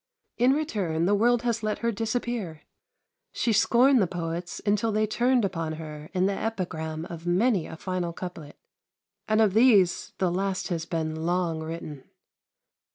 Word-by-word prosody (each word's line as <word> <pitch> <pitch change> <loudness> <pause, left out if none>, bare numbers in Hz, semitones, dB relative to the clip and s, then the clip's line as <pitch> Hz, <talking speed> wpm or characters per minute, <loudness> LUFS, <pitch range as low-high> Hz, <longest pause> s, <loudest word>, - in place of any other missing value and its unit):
In 250 +3 +5
return, 195 - -1
the 200 - +3
world 235 +3 +3
has 235 -2 0
let 215 -1 -1
her 235 - +3
disappear. 225 -6 -3 0.7
She 230 - +1
scorned 245 +4 +4
the 190 - +2
poets 170 0 -4
until 210 +2 +1
they 215 +1 +2
turned 240 +2 +2
upon 165 -4 -3
her 155 -1 -8
in 185 0 +1
the 200 - +1
epigram 165 -7 -3
of 170 0 -8
many 190 0 +2
a - - -8
final 180 -1 -3
couplet; 170 -4 -8 0.7
and 215 0 +2
of 210 -4 +3
these 215 -6 +4
the 185 -2 +1
last 190 +2 -2
has 170 -2 -3
been 160 -2 -3
long 175 -2 0
written. 160 -3 -7
185 Hz, 160 wpm, -26 LUFS, 165-225 Hz, 0.7 s, In